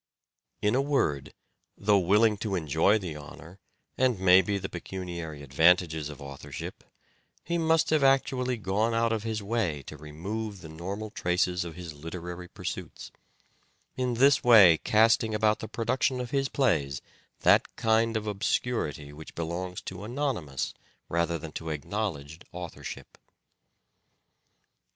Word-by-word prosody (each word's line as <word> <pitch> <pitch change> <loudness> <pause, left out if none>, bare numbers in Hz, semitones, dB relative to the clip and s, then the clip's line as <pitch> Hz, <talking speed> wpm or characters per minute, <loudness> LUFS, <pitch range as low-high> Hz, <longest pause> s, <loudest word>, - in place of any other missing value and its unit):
In 105 - +3
a 130 - +3
word, 130 - 0 0.5
though 100 0 +3
willing 105 +4 +4
to 100 -1 -2
enjoy 80 +5 +3
the 90 -7 -5
honour, 75 +5 -11 0.4
and, 125 -5 +2
maybe, 95 +2 +5
the 100 - -4
pecuniary 85 -4 -6
advantages 80 +2 +3
of 75 - -9
authorship, 70 -1 -8 0.6
he 170 0 -1
must 160 -1 +2
have 155 -3 +3
actually 130 -2 +2
gone 105 +3 0
out 115 0 +2
of 110 - -1
his 110 -1 -3
way 100 -10 -1
to 75 - -9
remove 95 +8 -6
the 80 - -10
normal 100 +7 -6
traces 90 -1 0
of 85 -2 -8
his 85 -3 -7
literary 85 +4 -7
pursuits; - - -7 0.8
in 125 -2 -1
this 140 +4 +5
way 100 -9 +8
casting 110 0 +3
about 105 0 +2
the 110 - -6
production 125 +3 0
of 125 -1 -5
his 135 -1 0
plays 80 - 0 0.4
that - - +4
kind 115 -1 +2
of 110 - -4
obscurity 100 - -2
which 80 +1 -11
belongs 90 +2 -4
to 95 +1 -7
anonymous 110 - -2 0.4
rather 85 0 0
than 80 0 -8
to 80 +1 -6
acknowledged 80 -1 -4
authorship. 90 -1 -8
95 Hz, 135 wpm, -28 LUFS, 80-115 Hz, 0.8 s, way